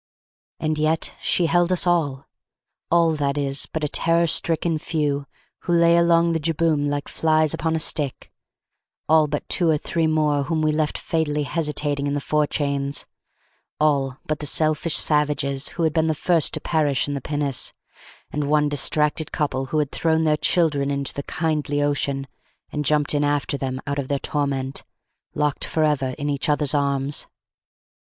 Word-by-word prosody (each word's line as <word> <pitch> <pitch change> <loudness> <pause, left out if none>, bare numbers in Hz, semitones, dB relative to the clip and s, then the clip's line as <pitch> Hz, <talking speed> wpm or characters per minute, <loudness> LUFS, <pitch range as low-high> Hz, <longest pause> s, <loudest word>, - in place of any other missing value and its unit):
And 155 -1 -1
yet 155 +1 0
she 175 - +2
held 175 +2 +2
us 185 - +1
all! 150 -6 0 0.6
All, 170 -1 +4
that 140 0 -1
is, 140 -1 0
but 160 - -5
a - - +1
terror 165 +3 +2
stricken 165 0 +1
few, 145 -3 -2 0.3
who 175 - -2
lay 170 0 +5
along 170 0 +3
the 165 - 0
jibboom 155 -2 0
like 145 0 -3
flies 155 -1 +1
upon 160 0 -1
a - - 0
stick: 150 -3 -2 0.8
all 155 0 +4
but 145 0 -4
two 170 -2 +2
or 155 - +3
three 165 +2 -1
more 150 -2 +1
whom 160 0 -1
we 155 - +2
left 150 0 -1
fatally 150 -2 -1
hesitating 145 -2 -1
in 140 - -1
the - - 0
forechains: 140 -1 -1 0.7
all 140 -4 +1
but 155 -1 -2
the 150 - -2
selfish 155 +2 +2
savages 145 -2 +1
who 170 - 0
had 160 -2 +1
been 160 -1 +1
the 160 - 0
first 165 0 +1
to - - -3
perish 145 -5 +1
in 145 - -3
the 140 - -4
pinnace, 145 -1 -1 0.6
and 145 -1 -2
one 150 0 +3
distracted 150 +1 +1
couple 135 -3 -2
who 155 - -2
had 150 -2 0
thrown 160 -1 +1
their 155 -1 +3
children 150 -3 +1
into 140 -1 -1
the 140 - -4
kindly 150 -2 -2
ocean, 140 -1 -1 0.5
and 150 -1 -3
jumped 150 +1 +2
in 145 0 +1
after 145 -1 0
them 130 -1 -3
out 140 0 -2
of 135 - -3
their 140 - 0
torment, 140 -2 -2 0.5
locked 150 -1 0
for 160 - 0
ever 135 -4 0
in 145 -1 -3
each 145 +2 -1
other's 150 -1 +1
arms. 140 -1 +1
150 Hz, 175 wpm, -22 LUFS, 140-160 Hz, 0.8 s, lay